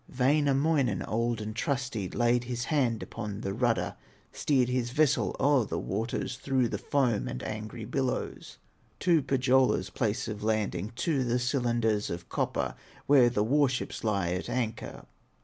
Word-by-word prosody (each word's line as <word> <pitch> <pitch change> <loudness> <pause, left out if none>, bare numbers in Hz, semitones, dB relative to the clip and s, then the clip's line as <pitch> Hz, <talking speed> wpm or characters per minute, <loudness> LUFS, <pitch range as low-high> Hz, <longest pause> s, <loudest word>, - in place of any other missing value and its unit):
Wainamoinen, 140 +1 +2
old 115 +1 -1
and 105 0 -5
trusty, 120 -6 -2
Laid 120 0 +1
his 120 0 -3
hand 125 -6 +1
upon 105 -2 -6
the 95 - -3
rudder, 120 +1 0 0.4
Steered 130 -4 +1
his 125 -1 -1
vessel 150 +2 +2
o'er 140 -2 +4
the - - -3
waters, 115 +5 -3
Through 130 -3 +1
the 105 - -3
foam 125 -3 +1
and 60 - -5
angry 110 +1 -5
billows 130 +2 -3 0.4
To 170 -4 +4
Pohyola's 130 -8 +2
place 115 +4 -1
of 105 -1 -5
landing, 105 -2 -1
To 140 0 0
the 120 0 +1
cylinders 120 -4 0
of 85 0 -6
copper, - - -1 0.3
Where 135 -4 +6
the 105 -3 +1
war 140 +4 +3
ships 130 - -4
lie 100 -6 0
at 90 +1 -3
anchor. 115 -3 -3
120 Hz, 150 wpm, -29 LUFS, 110-130 Hz, 0.4 s, Where